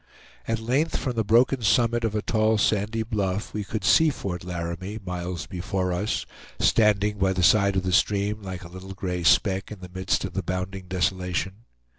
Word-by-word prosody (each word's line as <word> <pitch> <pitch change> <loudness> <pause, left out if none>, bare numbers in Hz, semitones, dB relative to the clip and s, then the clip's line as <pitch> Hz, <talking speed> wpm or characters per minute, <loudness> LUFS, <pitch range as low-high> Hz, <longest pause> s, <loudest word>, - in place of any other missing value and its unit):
At 115 - 0
length, 130 +9 0
from 130 - -2
the 115 - +1
broken 120 +5 +3
summit 115 +2 +2
of 110 -2 -1
a 105 - -1
tall 110 0 +2
sandy 110 +1 +1
bluff 105 -3 -2
we 105 - -2
could 105 0 -4
see 160 - +5
Fort 90 - -4
Laramie, 90 +3 -5
miles 90 -2 -4
before 90 +2 -2
us, 100 +5 -1 0.3
standing 105 -2 +3
by 95 0 +2
the 90 -1 -1
side 100 0 +4
of 95 - +1
the 90 -1 -1
stream 105 +2 +1
like 95 -3 -6
a - - -9
little 95 +2 -9
gray 90 -2 -3
speck 95 +3 +2
in 105 - -8
the 90 -1 -10
midst 95 +1 0
of 95 - -7
the 95 - -1
bounding 90 0 -4
desolation. 95 +3 -2
95 Hz, 190 wpm, -25 LUFS, 90-110 Hz, 0.3 s, see